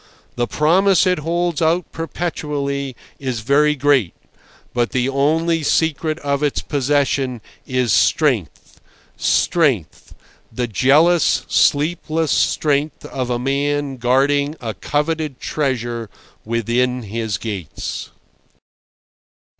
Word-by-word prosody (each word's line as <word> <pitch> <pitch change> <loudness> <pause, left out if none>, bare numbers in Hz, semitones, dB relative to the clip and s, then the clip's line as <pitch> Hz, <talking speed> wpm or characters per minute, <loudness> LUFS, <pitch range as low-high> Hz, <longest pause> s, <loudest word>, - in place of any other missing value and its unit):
The 120 0 -1
promise 185 +7 +3
it 180 -3 +2
holds 170 +1 -1
out 165 +2 +1
perpetually 145 -5 -3 0.2
is 130 -5 -3
very 150 +5 +3
great; 135 - +2 0.6
but 120 -1 0
the 130 0 +1
only 160 +5 +1
secret 155 +1 0
of 140 0 -1
its 145 -2 0
possession 140 -3 0 0.3
is 125 -4 +1
strength, 125 - +1 0.3
strength—the 125 - -1
jealous, 155 - +3
sleepless 155 +1 +1
strength 150 0 0
of 130 -2 -4
a 120 - 0
man 140 +1 -1
guarding 140 +4 +2
a 115 -3 -4
coveted 150 - -2
treasure 120 -6 -2 0.4
within 120 +2 0
his 110 -1 -3
gates. 100 -9 -5
140 Hz, 100 wpm, -19 LUFS, 125-155 Hz, 0.6 s, promise